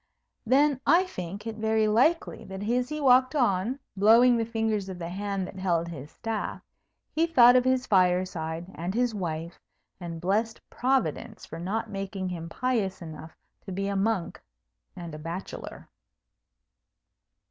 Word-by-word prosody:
Then 275 +2 +3
I 335 +5 +6
think 195 - -7
it 225 -1 -5
very 220 0 +2
likely 255 +11 +2
that 190 +1 -7
as 245 +2 +1
he 305 0 -3
walked 255 0 +4
on, 230 -1 +1 0.2
blowing 230 +5 +6
the 230 -1 0
fingers 220 -4 -1
of 185 - -6
the 170 -1 -5
hand 195 +1 -3
that 190 - -10
held 170 -3 0
his 145 -3 -8
staff, 225 +2 -4 0.5
he 325 +2 +1
thought 245 -6 +7
of 250 - +5
his 260 0 +2
fireside 180 -4 +1
and 175 +4 -4
his 245 -1 +1
wife, 170 -4 -4 0.4
and 170 -2 -6
blessed 215 +6 0
Providence 255 - -1
for 165 - -8
not 215 +5 -3
making 195 -1 -4
him 165 -2 -6
pious 215 -3 -1
enough 160 0 -10 0.3
to - - -5
be 195 +2 -2
a 200 - -2
monk 195 -2 -1 0.5
and 170 -2 -8
a 155 - -7
bachelor. 170 +4 -7
200 Hz, 155 wpm, -27 LUFS, 180-245 Hz, 0.5 s, thought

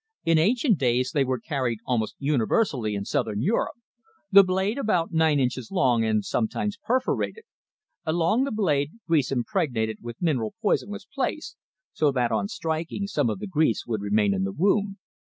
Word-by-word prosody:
In 165 -1 +4
ancient 225 - +2
days 125 -1 +1
they 145 -3 +2
were 130 -1 -1
carried 125 -2 -2
almost 115 -4 -1
universally 135 - 0
in 100 0 -3
Southern 105 +2 -1
Europe 220 +10 0 0.6
the 200 0 +9
blade 190 +6 0
about 180 -10 0
nine 160 -2 +3
inches 130 -2 -1
long, 125 -12 +2
and 110 -2 +1
sometimes 200 - -2
perforated. 260 - -1 0.6
Along 170 +9 +1
the 275 - -2
blade, 150 -9 0
grease 155 -7 +1
impregnated 120 -3 -1
with 120 0 -8
mineral 145 - -1
poison 205 -2 +1
was 205 -1 -7
placed, 275 +5 -3 0.4
so 150 -2 +2
that, 125 -3 +1
on 105 -3 0
striking, 160 - -3
some 145 - 0
of 105 - -2
the - - -6
grease 155 - +1
would 110 -3 -2
remain 100 0 +2
in 95 - -1
the 95 - -1
wound. 195 - +1
145 Hz, 170 wpm, -25 LUFS, 115-195 Hz, 0.6 s, the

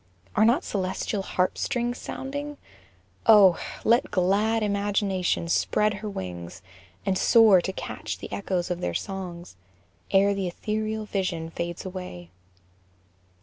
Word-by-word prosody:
Are 215 - +5
not 245 +10 +3
celestial 195 +1 -2
harp 185 -1 -1
strings 245 -2 -1
sounding? 285 +2 -5 0.7
Oh! 200 -5 +7 0.2
Let 235 +2 +3
glad 205 +4 +2
imagination 200 -4 0
spread 210 +5 +2
her 210 +1 -5
wings, 90 - -7 0.4
And 195 -1 +1
soar 220 -6 +6
to 190 - -3
catch - - -5
the - - -9
echoes 185 -3 -2
of 175 0 -3
their - - -2
songs 180 - -6 0.5
Ere 200 +1 +4
the 195 -2 -2
ethereal 215 +3 -3
vision 180 -5 -2
fades 170 +2 -5
away. 180 - -7
195 Hz, 125 wpm, -26 LUFS, 180-215 Hz, 0.7 s, Oh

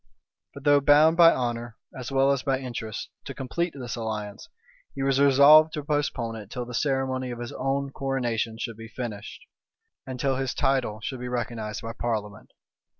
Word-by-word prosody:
But 140 - -10
though 145 -1 +5
bound 150 +3 +6
by 170 -1 +8
honor, 120 -2 -3 0.2
as 130 0 -6
well 135 0 +3
as 140 -1 0
by 135 -1 0
interest, 115 -4 -6
to - - -7
complete 170 +6 -3
this 125 -2 -5
alliance, 105 -3 -5 0.5
he 135 - -3
was 135 0 +2
resolved 140 +3 +7
to 150 - -4
postpone 140 -6 -2
it 105 -2 -10
till 125 0 -5
the 125 - -9
ceremony 130 -1 -1
of 120 - -5
his 120 0 -6
own 135 +1 -2
coronation 120 -5 -2
should 115 -1 -5
be 115 0 -9
finished, 115 - -7 0.6
and 130 -1 -6
till 135 0 +1
his 135 -2 -2
title 130 -6 0
should 130 +3 -5
be 125 - -5
recognized 115 -3 -4
by 115 0 -5
parliament. 110 -3 -4
130 Hz, 180 wpm, -26 LUFS, 115-140 Hz, 0.6 s, by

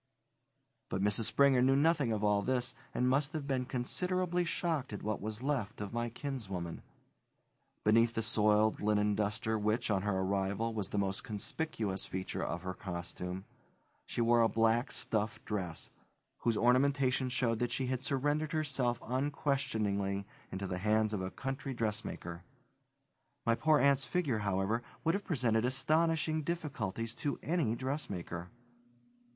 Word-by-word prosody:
But 95 - -1
Mrs. 105 +2 +3
Springer 130 +3 +5
knew 135 +2 +5
nothing 145 -4 +3
of 105 -1 -1
all 105 -1 +3
this, 125 +2 0 0.2
and 125 - +1
must 140 +4 +2
have 155 -3 -3
been 130 -2 0
considerably 180 +8 0
shocked 165 -6 -1
at 105 - -6
what 105 0 -2
was 110 +3 -4
left 130 -7 -1
of 105 0 -5
my 120 0 -1
kinswoman. 100 - -4 1.0
Beneath 115 +2 +4
the 115 - 0
soiled 105 0 +3
linen 105 0 +2
duster 105 +1 0
which, 105 +2 +1
on 95 -2 +2
her 100 -1 0
arrival, 100 +4 0
was 105 -3 -2
the - - -3
most 100 -1 0
conspicuous 105 -2 -3
feature 95 0 -3
of 85 +1 -3
her 95 0 -3
costume, 90 +1 -5 0.6
she - - -2
wore 120 0 +5
a 115 - +4
black 115 +3 +2
stuff 110 0 -1
dress, 90 -6 -3 0.5
whose 115 -2 +1
ornamentation 130 +1 +3
showed 120 -3 +1
that 120 -1 0
she 130 - 0
had 130 0 -1
surrendered 145 +3 0
herself 135 -6 0
unquestioningly 110 -8 0 0.3
into 95 +1 -3
the 90 -1 -3
hands 110 +2 +2
of 100 - -1
a 95 - -2
country 135 +5 -4
dressmaker. 105 -6 -3 1.0
My 115 - +4
poor 155 +5 +4
aunt's 140 -1 +4
figure, 145 -11 0
however, 100 +3 0 0.2
would 165 0 +3
have 200 +1 -2
presented 120 - +2
astonishing 155 +4 +2
difficulties 125 - -3
to 145 - -1
any 155 -9 +1
dressmaker. 100 - -4
115 Hz, 150 wpm, -33 LUFS, 105-135 Hz, 1.0 s, Springer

